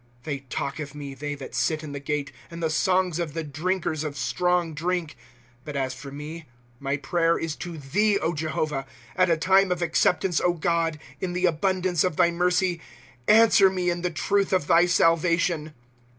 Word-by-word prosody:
" 120 - -32
They 145 -3 -3
talk 135 +2 -4
of 145 -1 -6
me, 140 -2 -7
they 145 +1 -5
that 140 - -9
sit 155 -1 0
in 150 - -7
the 140 - -5
gate. 140 0 -3 0.2
And 170 0 -7
the 160 - +1
songs 180 0 +1
of 165 -3 -3
the 165 - -2
drinkers 155 +1 -2
of 150 -2 -5
strong 180 -2 0
drink. 170 +1 -2 0.2
" 120 0 -31
But 150 -1 -7
as 130 -1 -1
for 135 +2 -9
me, 150 +3 -8 0.3
my 140 +1 -1
prayer 165 +4 +1
is 165 -2 -3
to 175 -2 -6
thee, 200 +9 +1 0.2
Jehovah; 155 -3 -2 0.3
At 185 +3 +3
a 165 - +3
time 190 +3 +3
of 175 -1 0
acceptance, 170 +1 +2
O 175 - +2
God, 165 -1 0 0.2
in 180 -1 -3
the 180 +1 +1
abundance 180 0 +1
of 180 -4 0
thy 170 0 +4
mercy, 180 0 +1 0.5
Answer 220 -2 +6
me 180 -2 0
in 175 0 -3
the 180 - 0
truth 195 +4 0
of 185 -6 +2
thy 170 +3 +5
salvation. 165 -2 +2
165 Hz, 195 wpm, -25 LUFS, 150-180 Hz, 0.5 s, Answer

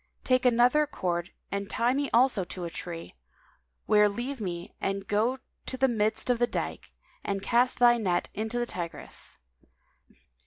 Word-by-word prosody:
Take 255 -1 +3
another 250 +5 +4
cord 175 - -2 0.2
and 200 0 -3
tie 240 +2 +1
me 280 +1 -1
also 240 -4 +4
to 180 0 -7
a 170 - -4
tree, 170 -1 -7 0.7
where 210 -1 +5
leave 240 +5 -4
me 175 -3 -5
and 195 0 -2
go 225 +5 +1 0.3
to 260 - -4
the 265 +1 +4
midst 220 +1 +1
of 240 - 0
The 240 - +3
Dyke - - -4
[FN#195] - - -35
and 195 -1 -2
cast 245 +1 +3
thy 240 -1 +5
net 180 -5 0
into 220 +3 -2
the 240 - 0
Tigris. 170 -7 -2
225 Hz, 165 wpm, -28 LUFS, 195-245 Hz, 0.7 s, where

